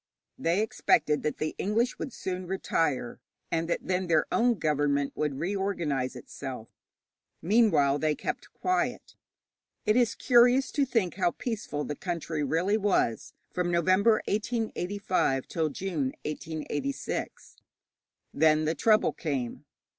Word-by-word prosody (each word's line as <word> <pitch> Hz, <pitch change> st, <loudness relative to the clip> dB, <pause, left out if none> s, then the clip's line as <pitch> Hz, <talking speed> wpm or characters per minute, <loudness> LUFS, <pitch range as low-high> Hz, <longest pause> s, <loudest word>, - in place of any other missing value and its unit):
They 175 Hz, +6 st, +2 dB
expected 150 Hz, -8 st, +2 dB
that 150 Hz, -, -2 dB
the 155 Hz, -, -2 dB
English 230 Hz, +5 st, 0 dB
would 275 Hz, -, -4 dB
soon 185 Hz, -3 st, -5 dB
retire, 150 Hz, -10 st, -1 dB, 0.3 s
and 165 Hz, 0 st, -1 dB
that -, -, 0 dB
then 185 Hz, 0 st, 0 dB
their 160 Hz, -3 st, +3 dB
own 240 Hz, 0 st, +3 dB
government 145 Hz, -4 st, 0 dB
would 150 Hz, -3 st, -1 dB
reorganize 170 Hz, -7 st, -1 dB
itself. 125 Hz, -2 st, -7 dB, 0.7 s
Meanwhile 170 Hz, -9 st, +3 dB
they 155 Hz, 0 st, +1 dB
kept -, -, -5 dB
quiet. 365 Hz, 0 st, -1 dB, 0.7 s
It 215 Hz, 0 st, +3 dB
is 245 Hz, -3 st, +3 dB
curious 245 Hz, +1 st, +4 dB
to 285 Hz, -, +2 dB
think 200 Hz, -8 st, 0 dB
how 185 Hz, -, +3 dB
peaceful 200 Hz, -, -4 dB
the 150 Hz, -, -4 dB
country 165 Hz, -2 st, -3 dB
really 175 Hz, +9 st, +1 dB
was 195 Hz, -, 0 dB, 0.2 s
from 180 Hz, -1 st, 0 dB
November, 185 Hz, +6 st, +3 dB
1885, 205 Hz, -, -1 dB
till 160 Hz, -2 st, -1 dB
June, 150 Hz, -4 st, -2 dB
1886. 150 Hz, -3 st, -4 dB, 0.8 s
Then 155 Hz, 0 st, +4 dB
the 160 Hz, -, +1 dB
trouble 215 Hz, +7 st, +3 dB
came. 135 Hz, -7 st, -3 dB
170 Hz, 125 wpm, -28 LUFS, 150-205 Hz, 0.8 s, curious